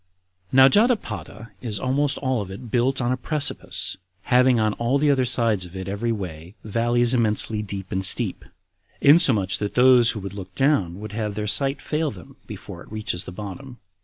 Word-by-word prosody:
7. - - -5
Now 130 0 +9
Jotapata 115 - 0
is 110 -4 -3
almost 140 +2 0
all 130 -4 -1
of 100 - -7
it 105 +4 -10
built 130 +2 +1
on 120 0 0
a 130 - 0
precipice, 150 +2 -3 0.3
having 125 -1 +3
on 110 -1 +1
all 120 +4 +1
the 145 0 +2
other 130 -2 +1
sides 115 -5 +1
of 90 +1 -12
it 95 0 -6
every 105 +4 -2
way 90 -3 -7
valleys 120 +3 +1
immensely 110 -2 +1
deep 100 -2 -6
and 95 0 -2
steep, - - +2 0.6
insomuch 130 - +5
that 105 -1 -4
those 125 -1 +5
who 110 - -2
would 100 0 -7
look 95 -2 -10
down 100 - +1
would 110 0 -8
have 105 -1 -4
their 105 0 -3
sight 135 +5 +2
fail 155 0 -1
them 90 -8 -12
before - - -9
it - - -15
reaches 110 -5 -2
to - - -7
the - - -6
bottom. 110 +7 -9
115 Hz, 195 wpm, -23 LUFS, 100-130 Hz, 0.6 s, Now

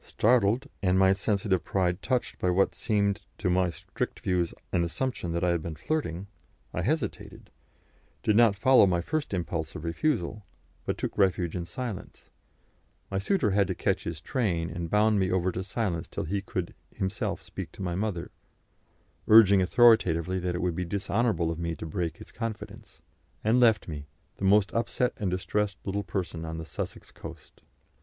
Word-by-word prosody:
Startled, 115 +1 +2
and 95 -2 +3
my 95 0 +5
sensitive 100 -1 0
pride 90 -2 0
touched 125 -2 -1
by 90 - +1
what 95 +2 +3
seemed 100 -1 0 0.2
to 90 -5 0
my 90 0 +3
strict 85 - -5
views 90 -2 0 0.2
an 85 - +2
assumption 90 0 -2
that 85 - -1
I 90 - +3
had 85 -2 0
been 80 0 -5
flirting, 95 - -2 0.5
I - - -1
hesitated, 145 -6 -3 0.7
did 105 - +3
not 115 -2 +6
follow 125 +1 +6
my 90 -2 +1
first 155 - -2
impulse 85 -4 -3
of 75 - -6
refusal, 105 - -1 0.4
but - - -1
took - - -3
refuge 90 -4 +2
in 85 -1 -3
silence; 115 +1 -7 0.8
my 95 - 0
suitor 115 - +1
had 100 0 +3
to - - -2
catch - - 0
his 80 -2 -4
train, 85 -7 -1
and 85 -1 -4
bound 105 +1 +3
me 95 -1 +1
over 95 0 +1
to 90 +1 -4
silence 95 -5 -2
till - - -4
he 100 +5 -2
could 90 -3 -4 0.2
himself 95 +1 -3
speak - - -7
to - - -7
my 90 -2 -1
mother, 95 -2 -2 1.0
urging 100 -3 +8
authoritatively 95 -4 +4
that 90 -1 -2
it 90 - -2
would 90 -1 +1
be 90 - -1
dishonourable 100 0 0
of 85 - -5
me 85 -1 -2
to - - -7
break 85 0 -3
his - - -13
confidence, 115 -3 -7 0.4
and 115 +4 +3
left 115 -3 +4
me 75 -3 -6 0.3
the 95 - -2
most 100 +1 +4
upset 120 +1 0
and 100 -4 -1
distressed 100 +2 -1
little 100 +1 -1
person 85 -5 -4
on 80 0 -5
the 80 - -6
Sussex - - -6
coast. - - -11
95 Hz, 180 wpm, -28 LUFS, 85-105 Hz, 1.0 s, urging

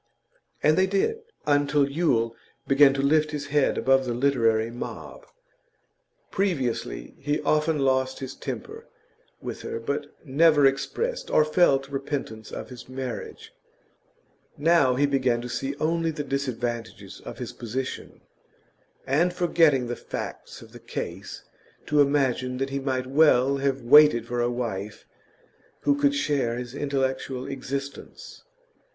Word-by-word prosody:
And 155 +3 +4
they 190 - +4
did, 200 - 0 0.3
until 145 -1 +2
Yule 125 -7 0 0.3
began 135 0 +6
to 135 - -1
lift 155 +2 +3
his 150 -1 -4
head 145 -2 +2
above 135 +2 +3
the 120 -2 -2
literary 115 -4 +2
mob. 125 - -8 1.0
Previously, 135 - -2
he 145 +2 -1
often 155 +1 +1
lost 130 -1 +1
his 135 -1 -6
temper - - -7 0.5
with - - -6
her, - - -5
but 140 +5 -3 0.2
never 150 +1 +4
expressed 455 - -1
or 155 - +4
felt 155 -4 +3
repentance 135 -5 -5
of - - -7
his 125 -1 -11
marriage; 130 -1 -6 1.0
now 155 -4 +4
he 145 +3 +3
began 130 -4 +1
to 120 - -6
see 135 +3 -3
only 165 +2 0
the 150 -2 -4
disadvantages 120 -4 -4
of - - -8
his - - -6
position, 125 +3 -5 0.8
and, 170 +7 +1
forgetting 165 -7 +3
the 120 0 -3
facts - - -7
of - - -16
the - - -12
case, - - -6 0.4
to 150 -1 +3
imagine 130 -3 +1
that 135 +1 -2
he 140 - -1
might 130 -2 -2
well 140 -1 +4
have 135 -1 -1
waited 140 -2 +6
for 120 0 -2
a 120 - +1
wife 110 -4 -4 0.8
who 145 - +3
could 145 0 +2
share 140 -5 0
his 125 0 -6
intellectual 135 -2 -2
existence. 140 +1 -7
135 Hz, 135 wpm, -25 LUFS, 125-150 Hz, 1.0 s, began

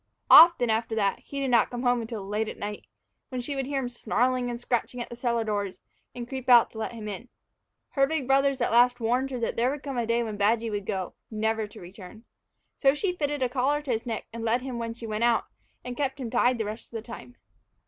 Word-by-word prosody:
Often, 330 -9 +9
after 225 +1 -1
that, 200 -3 +1
he 280 - -7
did 270 -2 -1
not 235 -2 +4
come 245 0 -5
home 245 -1 +2
until 225 -3 -6
late 210 +2 -2
at - - -8
night, 205 0 -6 0.4
when 255 -2 -4
she 280 +4 -4
would 270 -1 -2
hear 280 0 -2
him 250 - -3
snarling 245 +1 0
and 240 0 -4
scratching 245 0 -2
at 240 - -5
the - - -6
cellar 235 -1 0
doors, 205 -3 -3 0.4
and 240 -1 -6
creep 260 0 -6
out 240 -2 +7
to 220 - -9
let 220 - -3
him 220 -2 -7
in. 210 +4 -7 0.6
Her 275 -1 +2
big 315 -3 -2
brothers 275 0 +2
at - - +1
last 245 +1 +4
warned 245 +4 0
her 255 -2 -4
that 230 - -2
there 240 +2 +2
would 290 +1 -5
come 275 -3 -4
a 230 - -1
day 235 +1 +1
when 215 -2 -5
Badgy 220 +2 +1
would 205 -2 -4
go, 190 -3 -3 0.2
never 220 0 -1
to 215 - -13
return. 190 +4 -12 0.5
So 275 0 +4
she 360 +3 -1
fitted 290 -4 -1
a - - +2
collar 280 +4 0
to 275 - -3
his 230 +1 -2
neck 225 - -3
and 230 0 -6
led 235 +2 +1
him 255 -3 -5
when 230 0 -4
she 235 - -8
went 215 0 -2
out, 235 -2 +3 0.4
and 250 0 -5
kept 275 +1 -2
him 240 -4 -5
tied 245 0 +3
the 220 - -2
rest 215 +2 -6
of - - -31
the 220 - -7
time. 240 +1 -10
240 Hz, 250 wpm, -27 LUFS, 220-255 Hz, 0.6 s, Often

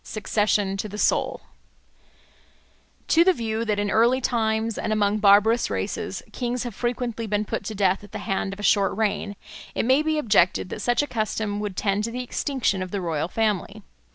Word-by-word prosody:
Succession 205 -2 0
to 210 +2 -4
the 205 - -7
Soul - - +1 1.7
TO 335 - +5
THE 375 +1 +4
VIEW 225 -5 -2
that 210 -2 0
in 205 -1 -1
early 235 +5 +4
times, 225 -2 0
and 220 - -2
among 210 0 +1
barbarous 210 +3 +5
races, - - -3
kings 245 -1 -2
have 240 -3 -5
frequently 240 0 -3
been 210 0 0
put - - -3
to 215 - -4
death 195 0 +1
at 205 - -13
the - - -6
end 195 0 -1
of 195 - -8
a - - -6
short 200 -2 +3
reign, 205 -1 -1 0.4
it - - 0
may 260 +4 +4
be 310 0 0
objected 195 - +2
that 210 - -6
such 245 +5 +2
a - - -4
custom 215 -3 -2
would 205 -3 -4
tend 200 0 0
to - - -3
the 250 +1 -4
extinction 250 -6 -1
of 185 - -4
the 200 - -3
royal 165 -3 -2
family. 210 0 -1
215 Hz, 195 wpm, -24 LUFS, 200-235 Hz, 1.7 s, TO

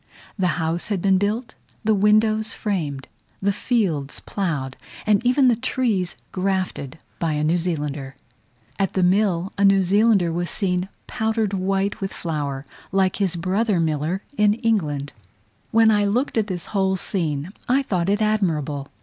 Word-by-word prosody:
The 185 -4 0
house 165 +1 -1
had 205 -3 -1
been 190 +1 +3
built, 215 +5 -1 0.3
the 220 0 +3
windows 215 +2 +3
framed, 155 -10 -3 0.3
the 200 +1 +1
fields 185 - -1
ploughed, 150 -10 -3 0.3
and 210 0 +3
even 255 +2 +4
the 240 - +5
trees 230 -7 0 0.2
grafted, 185 -7 -2 0.2
by 165 -2 0
a 150 0 -1
New 165 +3 +2
Zealander. 145 -5 -3 0.6
At 195 -2 0
the 190 - +1
mill, 185 -1 +2
a - - +3
New 195 -1 +5
Zealander 195 -2 +3
was 175 +1 -2
seen 180 -1 0 0.2
powdered 220 -2 -1
white 195 +1 0
with 195 - -3
flower, 145 -5 -3 0.3
like 190 -1 +2
his 190 -4 0
brother 190 +3 +1
miller 160 +4 -1
in 210 0 +4
England. 160 - -1 0.6
When 225 0 +5
I 205 -1 +3
looked 240 +8 0
at 220 -2 +1
this 180 -4 -4
whole 190 -1 +2
scene, 165 -4 -2 0.2
I 270 +3 +3
thought 185 -7 -1
it 205 +2 +2
admirable. 155 -10 0
190 Hz, 155 wpm, -23 LUFS, 165-210 Hz, 0.6 s, the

